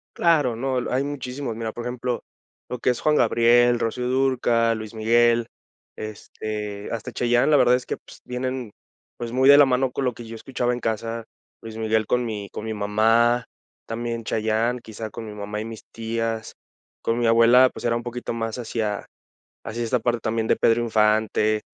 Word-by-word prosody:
Claro, 150 Hz, -9 st, +3 dB
no, 130 Hz, +2 st, -1 dB
hay 130 Hz, +2 st, +1 dB
muchísimos. 135 Hz, -3 st, -4 dB
Mira, 115 Hz, -1 st, -4 dB
por 120 Hz, -, -7 dB
ejemplo, 125 Hz, 0 st, -3 dB, 0.5 s
lo 125 Hz, -, -4 dB
que -, -, +1 dB
es 125 Hz, -, 0 dB
Juan 150 Hz, 0 st, +3 dB
Gabriel, 120 Hz, 0 st, +4 dB
Rocío 125 Hz, +2 st, -2 dB
Dúrcal, 120 Hz, -3 st, +2 dB
Luis 110 Hz, 0 st, -8 dB
Miguel, 115 Hz, +1 st, +3 dB, 0.5 s
este, 105 Hz, -1 st, -6 dB
hasta 115 Hz, -2 st, -4 dB
Chayanne, 120 Hz, +4 st, +2 dB
la 145 Hz, -, +6 dB
verdad 125 Hz, 0 st, +5 dB
es 125 Hz, -, -3 dB
que, -, -, -3 dB
pues, -, -, -16 dB
vienen, 125 Hz, -2 st, -4 dB, 0.5 s
pues, 120 Hz, -1 st, -5 dB
muy 130 Hz, +2 st, +3 dB
de 140 Hz, 0 st, +9 dB
la 145 Hz, -, +8 dB
mano 130 Hz, 0 st, +1 dB
con 135 Hz, -, -2 dB
lo 125 Hz, -, 0 dB
que 120 Hz, -, -10 dB
yo 115 Hz, 0 st, -8 dB
escuchaba 125 Hz, +1 st, -2 dB
en 120 Hz, -, -3 dB
casa. 115 Hz, 0 st, -3 dB, 0.4 s
Luis 110 Hz, -1 st, -8 dB
Miguel 110 Hz, -1 st, 0 dB
con 125 Hz, 0 st, +1 dB
mi 105 Hz, -3 st, -5 dB
con 110 Hz, -, -6 dB
mi 110 Hz, -, -3 dB
mamá, 115 Hz, +4 st, +2 dB, 0.4 s
también 115 Hz, 0 st, -3 dB
Chayanne, 110 Hz, +3 st, 0 dB
quizá, 110 Hz, -1 st, -7 dB
con 115 Hz, -, -8 dB
mi 105 Hz, -, -8 dB
mamá 105 Hz, +1 st, -5 dB
y -, -, -5 dB
mis 115 Hz, -1 st, -8 dB
tías. 115 Hz, 0 st, -3 dB, 0.5 s
Con 115 Hz, +1 st, 0 dB
mi 120 Hz, -, +2 dB
abuela, 120 Hz, +3 st, +6 dB
pues, -, -, -8 dB
era 115 Hz, 0 st, +2 dB
un 120 Hz, -, -3 dB
poquito 120 Hz, -1 st, -5 dB
más 115 Hz, 0 st, -3 dB
hacia 110 Hz, -3 st, -3 dB, 0.6 s
hacia 115 Hz, +1 st, -4 dB
esta 120 Hz, +2 st, +1 dB
parte 120 Hz, 0 st, 0 dB
también 110 Hz, 0 st, -1 dB
de -, -, +3 dB
Pedro 115 Hz, +1 st, +3 dB
Infante, 110 Hz, -1 st, +2 dB
115 Hz, 190 wpm, -24 LUFS, 110-125 Hz, 0.6 s, de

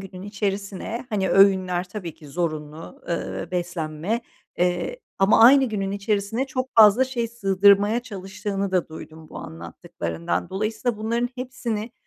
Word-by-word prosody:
günün 190 Hz, -1 st, -9 dB
içerisine, 205 Hz, +3 st, -4 dB
hani, 195 Hz, -4 st, 0 dB
öğünler 185 Hz, -2 st, +4 dB
tabii 185 Hz, -6 st, -6 dB
ki 150 Hz, -3 st, -14 dB
zorunlu, 155 Hz, -1 st, -5 dB
eee, 170 Hz, -, -3 dB
beslenme, 175 Hz, +3 st, -2 dB, 0.4 s
eee, 180 Hz, -, 0 dB, 0.2 s
ama 195 Hz, +3 st, +5 dB
aynı 270 Hz, +3 st, +8 dB
günün 200 Hz, -5 st, -2 dB
içerisine 205 Hz, +4 st, -1 dB
çok 255 Hz, -1 st, -3 dB
fazla 220 Hz, +3 st, +7 dB
şey 240 Hz, -3 st, -3 dB
sığdırmaya 200 Hz, 0 st, +3 dB
çalıştığını 200 Hz, -2 st, -4 dB
da 185 Hz, -2 st, 0 dB
duydum 160 Hz, 0 st, -11 dB
bu -, -, -9 dB
anlattıklarından. 85 Hz, +1 st, -5 dB
Dolayısıyla, 215 Hz, +3 st, -2 dB
bunların 235 Hz, +3 st, -1 dB
hepsini 240 Hz, -3 st, -4 dB
200 Hz, 130 wpm, -24 LUFS, 180-225 Hz, 0.4 s, aynı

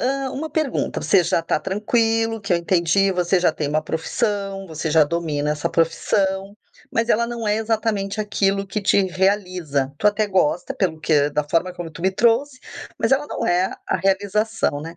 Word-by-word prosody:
Hã, 270 Hz, +1 st, -1 dB
uma 315 Hz, +4 st, -4 dB
pergunta: 310 Hz, -5 st, -1 dB
você 195 Hz, -3 st, +4 dB
já -, -, +1 dB
está 165 Hz, -, 0 dB
tranquilo 225 Hz, +2 st, 0 dB
que 200 Hz, -2 st, -2 dB
eu 175 Hz, -, +4 dB
entendi, 185 Hz, +3 st, +2 dB
você 180 Hz, +1 st, +1 dB
já 175 Hz, -, +3 dB
tem 150 Hz, -2 st, -3 dB
uma 155 Hz, +1 st, 0 dB
profissão, 195 Hz, +4 st, -2 dB
você 160 Hz, -1 st, -4 dB
já 155 Hz, 0 st, +5 dB
domina 150 Hz, -2 st, -2 dB
essa 150 Hz, 0 st, -1 dB
profissão, 190 Hz, +4 st, 0 dB, 0.4 s
mas 230 Hz, +1 st, 0 dB
ela 235 Hz, +2 st, +3 dB
não 235 Hz, -2 st, -5 dB
é 210 Hz, -, +2 dB
exatamente 220 Hz, -2 st, -1 dB
aquilo 200 Hz, -1 st, 0 dB
que 205 Hz, +2 st, -3 dB
te 200 Hz, 0 st, +3 dB
realiza, 185 Hz, -7 st, 0 dB
tu 210 Hz, -, +1 dB
até 210 Hz, +1 st, +2 dB
gosta, 185 Hz, -4 st, 0 dB
pelo 170 Hz, -5 st, -1 dB
que 150 Hz, -2 st, +2 dB
da 150 Hz, +1 st, 0 dB
forma 165 Hz, +5 st, 0 dB
como 175 Hz, -2 st, -7 dB
tu 155 Hz, -, -11 dB
me 190 Hz, -, +3 dB
trouxe, 240 Hz, +7 st, +1 dB, 0.4 s
mas 225 Hz, -, 0 dB
ela 285 Hz, +2 st, +2 dB
não -, -, -3 dB
é 180 Hz, +2 st, +1 dB
a -, -, +1 dB
realização, 200 Hz, -4 st, 0 dB
né. 165 Hz, +3 st, -8 dB
195 Hz, 190 wpm, -21 LUFS, 165-215 Hz, 0.4 s, já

